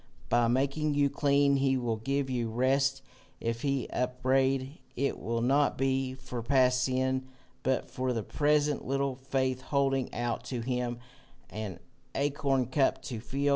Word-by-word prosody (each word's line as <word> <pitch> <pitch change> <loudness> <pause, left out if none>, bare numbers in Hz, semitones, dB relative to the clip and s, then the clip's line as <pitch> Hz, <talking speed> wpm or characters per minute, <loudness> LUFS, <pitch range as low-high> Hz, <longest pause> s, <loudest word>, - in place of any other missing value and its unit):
By 120 -1 +4
making 140 +5 +1
you 140 -1 +3
clean 140 -1 +3
he 135 -1 +2
will 120 -3 -1
give 135 +5 -1
you 120 -3 -1
rest. 135 +3 +1 0.4
If 115 0 -2
he 140 -2 0
upbraid, 130 +2 0 0.2
it 140 +2 -1
will 115 0 -2
not 140 +4 +3
be 130 -1 0
for 125 -2 -6
past 125 0 +3
sin, 130 0 0 0.3
but 130 +1 0
for 130 0 -1
the 115 -3 -1
present 150 +1 +1
little 135 0 0
faith, 130 -1 -1
holding 135 -1 0
out 120 -1 -2
to 125 -3 -3
him 125 0 -2 0.5
an 105 -4 -5 0.4
acorn 140 -2 +1
cup 135 +3 +1
to 120 -4 -5
fill. 140 +5 -1
130 Hz, 150 wpm, -30 LUFS, 125-140 Hz, 0.5 s, By